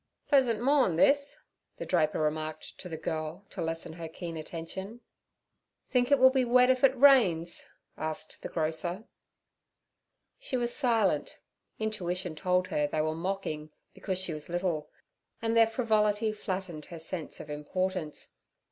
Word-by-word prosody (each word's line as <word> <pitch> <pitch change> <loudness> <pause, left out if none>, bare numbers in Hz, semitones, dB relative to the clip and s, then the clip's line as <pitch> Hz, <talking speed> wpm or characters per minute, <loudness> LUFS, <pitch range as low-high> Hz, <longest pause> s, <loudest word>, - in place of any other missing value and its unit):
'Pleasant 255 -7 +4
morn' 260 - +3
this' 280 - +3 0.4
the - - -5
draper 155 -4 +1
remarked 155 0 -2
to 180 - -7
the 160 - -5
girl 160 +4 -4
to - - -5
lessen 165 0 -3
her 165 0 -6
keen 165 0 -6
attention. 170 +7 -6 0.9
'Think 250 +1 +2
it 280 - +7
will 260 0 +7
be 260 -1 +2
wet 250 +1 +5
if 255 0 0
it 265 -1 +5
rains?' 200 -12 +4 0.3
asked 155 0 -4
the - - -5
grocer. 165 +4 -2 1.4
She 385 - -2
was 240 -1 -1
silent; 225 - +1 0.4
intuition 180 -5 -2
told 180 +3 +1
her 150 -1 +1
they 155 +1 0
were 155 0 0
mocking 165 -3 -3 0.2
because 190 -2 -3
she 185 -3 -2
was 150 +1 -7
little, 175 -3 -1 0.5
and 225 0 0
their 225 -1 +7
frivolity 220 -2 +1
flattened 185 -7 -5
her 170 - -9
sense 160 0 -5
of 150 - -8
importance. 175 +2 -3
185 Hz, 150 wpm, -30 LUFS, 160-230 Hz, 1.4 s, it